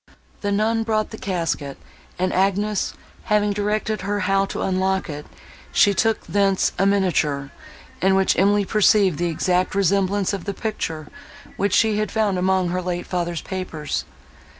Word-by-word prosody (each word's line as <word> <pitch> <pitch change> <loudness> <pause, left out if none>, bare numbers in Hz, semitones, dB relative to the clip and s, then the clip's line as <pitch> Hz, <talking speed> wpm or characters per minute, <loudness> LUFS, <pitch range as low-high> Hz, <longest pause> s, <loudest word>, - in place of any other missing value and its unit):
The 205 - -1
nun 220 +3 +1
brought 220 -1 -1
the 220 - -7
casket, 165 -7 -2 0.4
and 185 +1 0
Agnes, 200 +2 0 0.3
having 210 -1 +2
directed 210 +1 -1
her 205 +2 -2
how 195 +1 +2
to - - -4
unlock 190 -2 0
it, 150 0 -8 0.4
she 200 - +4
took 225 +2 0
thence 195 -2 +2
a 195 - +4
miniature, 155 -8 +1 0.5
in 190 +1 +4
which 190 0 +3
Emily 200 +2 +3
perceived 200 -5 +3
the 175 0 0
exact 180 +3 0
resemblance 200 +1 +1
of 195 -3 -4
the 200 -1 -3
picture, 165 -9 -4 0.5
which 200 0 +1
she 215 -2 +3
had 215 - -1
found 210 -4 +1
among 185 -1 +1
her 180 +1 -1
late 175 -1 -3
father's 175 -2 -2
papers. 180 -6 -4
195 Hz, 155 wpm, -22 LUFS, 180-205 Hz, 0.5 s, she